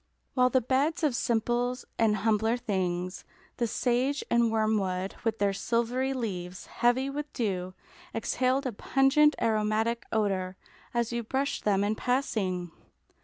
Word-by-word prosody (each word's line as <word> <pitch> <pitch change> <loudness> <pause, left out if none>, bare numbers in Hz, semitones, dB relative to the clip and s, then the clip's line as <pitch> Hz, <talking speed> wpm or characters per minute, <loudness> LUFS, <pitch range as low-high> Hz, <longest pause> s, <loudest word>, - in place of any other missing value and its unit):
While 250 -1 +4
the 260 +1 +3
beds 280 +8 +1
of 290 -5 +2
simples 240 +2 0
and 220 -2 +4
humbler 220 +2 +1
things, 185 -5 -2 0.3
the 235 - +1
sage 255 +5 0
and 235 -1 +4
wormwood, 200 -4 0
with 225 -2 0
their 200 -1 +1
silvery 240 +5 0
leaves 185 -8 -4
heavy 245 +3 +1
with 290 +2 -4
dew, 185 -5 -2 0.4
exhaled 255 +4 0
a 255 - -1
pungent, 270 +7 +3
aromatic 220 +1 0
odour 190 -4 0 0.3
as 235 -1 0
you 235 0 -1
brushed 265 +5 -2
them 200 -1 +3
in 205 +1 +1
passing. 210 -8 -1
230 Hz, 135 wpm, -29 LUFS, 205-255 Hz, 0.4 s, While